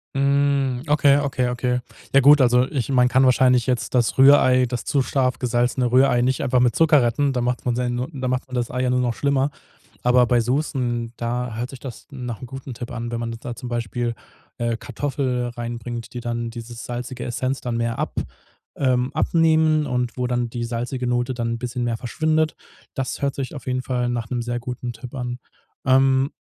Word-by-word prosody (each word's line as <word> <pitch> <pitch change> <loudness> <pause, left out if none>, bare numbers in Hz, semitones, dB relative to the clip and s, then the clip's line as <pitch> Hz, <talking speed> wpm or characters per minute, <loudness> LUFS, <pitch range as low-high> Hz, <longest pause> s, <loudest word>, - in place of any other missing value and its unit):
Mm, 140 -2 +2
okay, 145 -1 +5
okay, 130 -3 0
okay. 125 0 -1 0.3
Ja 135 - +6
gut, 145 +1 +7
also 125 0 +4
ich 135 -4 -2
man 125 -2 +4
kann 130 +2 +4
wahrscheinlich 125 -1 +4
jetzt 125 0 -1
das 120 +1 +1
Rührei, 130 -2 +6
das 120 -1 -4
zu 140 - +1
scharf 130 -1 0
gesalzene 120 0 +1
Rührei 130 0 +4
nicht 130 +1 +1
einfach 125 -2 +2
mit 125 -1 +2
Zucker 160 -4 +5
retten. 135 +4 +1
Da 125 - -1
macht 125 +1 -1
man 120 -1 +1
seine 125 0 -1
da 130 -2 -3
macht 125 0 -1
man 130 - -10
das 120 -2 -1
Ei 125 0 -2
ja 125 - +1
nur 125 0 +2
noch 120 -2 0
schlimmer. 140 +1 +1 0.5
Aber 125 0 +5
bei 120 0 +3
Soßen, 120 -2 -1
da 120 0 -2
hört 120 +2 -3
sich 135 - -10
das 130 -5 -9
nach 125 -5 -6
'nem 125 - -7
guten 135 0 -8
Tipp 120 0 -7
an, 120 0 -4
wenn 120 0 -3
man 115 0 -3
de 115 - -7
da 120 - -6
zum 120 +1 -7
Beispiel, 120 0 -2 0.4
äh, 120 -1 -1
Kartoffel 130 -3 -2
reinbringt, 120 0 -6
die 120 - -4
dann 120 0 -3
diese 115 0 -8
salzige 125 +2 -6
Essenz 130 +2 -2
dann 120 -2 -3
mehr 115 0 -1
ab - - -2 0.6
ähm 130 -1 +1
abnehmen 160 -2 +3
und 125 -2 -2
wo 125 -1 -1
dann 120 -1 -1
die 120 0 -4
salzige 120 +2 -3
Note 120 +1 0
dann 115 -1 -2
'n 115 - -4
bisschen 125 0 -3
mehr 115 -1 -1
verschwindet. 155 +5 0 0.4
Das 135 -2 -3
hört 140 -1 0
sich 135 0 -5
auf 145 - -9
jeden 130 0 -1
Fall 125 -2 -1
nach 120 -2 -3
'nem 125 - -1
sehr 120 0 -2
guten 125 0 -5
Tipp 120 +3 -10
an. 125 -2 -4 0.5
Ähm, 135 +1 +4
125 Hz, 210 wpm, -22 LUFS, 120-135 Hz, 0.6 s, gut